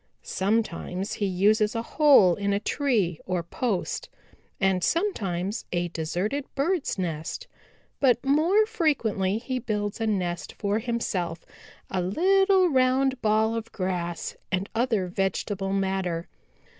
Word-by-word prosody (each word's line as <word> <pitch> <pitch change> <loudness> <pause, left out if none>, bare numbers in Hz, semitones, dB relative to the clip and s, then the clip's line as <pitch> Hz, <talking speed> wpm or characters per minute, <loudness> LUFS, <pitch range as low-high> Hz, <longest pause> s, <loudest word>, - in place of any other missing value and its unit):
Sometimes 195 -2 -1
he 205 - -1
uses 210 +4 +2
a 230 - -1
hole 270 - +5
in 200 +2 -1
a 200 - +1
tree 210 - 0
or 180 -2 -1
post 195 +3 -2 0.5
and 190 -2 +2
sometimes 210 - -1
a 175 0 -1
deserted 180 - -2
birds' 320 - 0
nest, 170 - -4 0.5
but 250 -2 +3
more 330 +10 +4
frequently 235 - 0
he 255 +2 -3
builds 210 -2 -3
a 225 - +1
nest 180 -5 -2
for 205 +1 0
himself 190 -8 -2 0.5
a 185 - 0
little 380 - +3
round 265 -2 +2
ball 220 +1 +2
of 230 0 -4
grass 175 -3 -3 0.2
and 190 +1 -1
other 225 -4 +1
vegetable 195 +1 -2
matter. 190 -3 -1
205 Hz, 125 wpm, -26 LUFS, 185-255 Hz, 0.5 s, hole